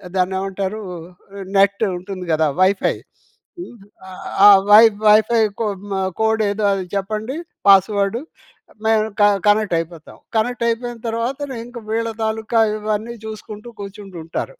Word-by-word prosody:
దాన్ని 185 0 +1
ఏమంటారు, 195 +2 -4 0.8
నెట్టు 200 +2 +3
ఉంటుంది 185 0 -7
గదా 155 0 +2
వైఫై 190 +1 +2 0.7
హ్మ్, 295 -9 -9 0.3
ఆహ్, 185 -1 -10 0.2
ఆ - - +11 0.2
వై 210 +1 +9 0.3
వైఫై 220 +2 +5 0.2
కోడ్ 205 -4 -3
హ్మ్ - - -1 0.2
కోడేదో 220 -1 0
అది 195 -1 -2
చెప్పండి, 215 +6 -3 0.3
పాస్వర్డు 200 +2 +4 0.7
మేము 220 -1 +3
క - - +5 0.2
కనెక్ట్ 205 -3 +3
అయిపోతాం. 165 -1 -9 0.2
కనెక్టైపోయిన 235 +1 -1
తర్వాత, 230 +4 -2 0.3
ఇంక 245 +1 -11
వీళ్ళ 230 +1 -1
తాలూకా 220 +1 -1 0.2
ఇవన్నీ 215 +2 -3
చూసుకుంటూ 215 +1 -9
కూర్చుంటూ 200 -2 -9
ఉంటారు. 165 - -5
210 Hz, 125 wpm, -19 LUFS, 195-225 Hz, 0.8 s, ఆ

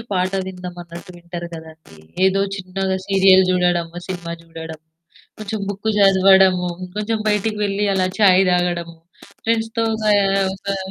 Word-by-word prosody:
పాట 185 0 0 0.2
విందాం 180 -1 -8
అన్నట్టు 170 +1 -11
వింటారు 170 0 -8
గదండీ. 160 - -13 0.3
ఏదో 195 +1 +2 0.2
చిన్నగా 190 0 -3
సీరియల్ 190 -1 +5
జూడడము, 175 -2 0
సినిమా 175 -3 -5
జూడడము, 160 -1 -10 0.5
కొంచెం 215 0 -5
బుక్కు 205 +2 -3
జదవడము, 190 -2 +5 0.3
కొంచెం 215 +1 -1
బయటికి 210 +1 0
వెళ్ళి 200 +1 -1
అలా 185 -1 +1
ఛాయ్ 190 -2 +6
దాగడం 175 -1 -1 0.5
ఫ్రెండ్స్‌తో 225 0 0 0.2
గయా 205 -2 +3 0.4
గా 195 - 0
185 Hz, 125 wpm, -20 LUFS, 175-200 Hz, 0.5 s, ఛాయ్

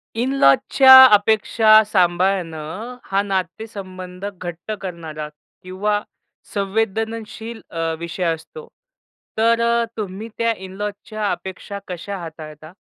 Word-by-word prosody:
In 245 +3 -1
लॉजच्या 260 - +8
अपेक्षा 215 +1 +5
सांभाळणं 180 +1 -1
हा 195 +1 +1
नातेसंबंध 185 -1 -5
घट्ट 180 -1 -7
करणारा 165 -5 -6 0.4
किंवा 205 +3 -1 0.5
संवेदनशील 220 +2 -3
अ, 165 -1 -2
विषय 170 +2 -5
असतो, 465 - -11 0.7
तर 230 +1 +3
अ, 235 0 +2
तुम्ही 210 +1 -5
त्या 230 0 +1
इन 190 -1 -10
लॉजच्या 210 +1 -4
अपेक्षा 190 +2 -6
कशा 185 +3 -6
हाताळता? 155 -2 -10
195 Hz, 105 wpm, -20 LUFS, 180-220 Hz, 0.7 s, लॉजच्या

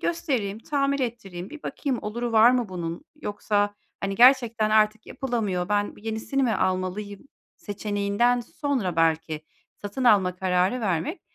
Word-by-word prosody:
göstereyim, 260 - -1
tamir 280 +2 0
ettireyim, 200 -7 -5
bir 310 0 -10
bakayım 265 -4 -2
oluru 235 +3 -3
var 225 +2 +7
mı 245 -4 0
bunun 170 - -5 0.2
yoksa, 205 0 0 0.3
hani, 195 0 -2
gerçekten 235 -2 +5
artık 215 0 +3
yapılamıyor, 210 -9 -2
ben 205 0 0
yenisini 220 +5 -2
mi 240 - +2
almalıyım?" 185 +2 -2 0.4
seçeneğinden 205 +3 0
sonra 240 - -2
belki 160 -1 +1 0.3
satın 205 +6 -5
alma 190 -6 +4
kararı 185 +5 +1
vermek 185 - -1
210 Hz, 130 wpm, -25 LUFS, 190-245 Hz, 0.4 s, var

